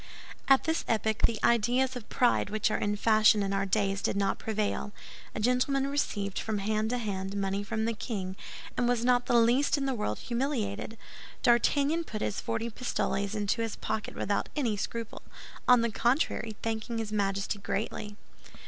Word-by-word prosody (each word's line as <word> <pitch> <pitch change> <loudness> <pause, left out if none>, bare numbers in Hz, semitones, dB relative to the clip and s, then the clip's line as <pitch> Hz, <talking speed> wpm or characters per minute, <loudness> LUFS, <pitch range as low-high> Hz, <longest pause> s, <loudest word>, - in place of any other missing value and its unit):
At 270 -1 +6
this 320 0 0
epoch, 220 -1 +2
the 230 - -3
ideas 245 +3 +3
of 240 -4 -8
pride 245 -4 +2
which 215 +1 0
are - - +1
in 205 0 0
fashion 215 0 +4
in 195 0 -1
our 195 0 0
days 195 -1 +1
did - - 0
not 195 -1 0
prevail. 210 -1 -2 0.4
A - - -2
gentleman 250 +4 +2
received, 205 -8 -1
from 220 -1 -2
hand 215 +2 0
to 250 - 0
hand, 200 -3 -3
money 195 0 -1
from 220 +2 -2
the 230 - 0
king, 195 -4 -4 0.4
and 245 - +1
was 240 -1 +1
not 245 -1 +3
the 240 - +2
least 240 +6 +4
in 275 - -1
the 270 - 0
world 210 - -2
humiliated. 235 -4 -2 0.5
D'Artagnan 285 +6 +3
put 215 -6 -6
his 200 - -2
forty 230 0 -2
pistoles 205 -3 -2
into 210 +2 0
his 225 -2 -2
pocket 220 0 -4
without 200 +1 -1
any 245 -8 0
scruple—on 230 +3 -1
the 235 -1 0
contrary, 235 -2 0
thanking 225 +1 -2
his 220 -2 -3
Majesty 200 0 -1
greatly. 210 +1 -3
220 Hz, 175 wpm, -29 LUFS, 205-245 Hz, 0.5 s, At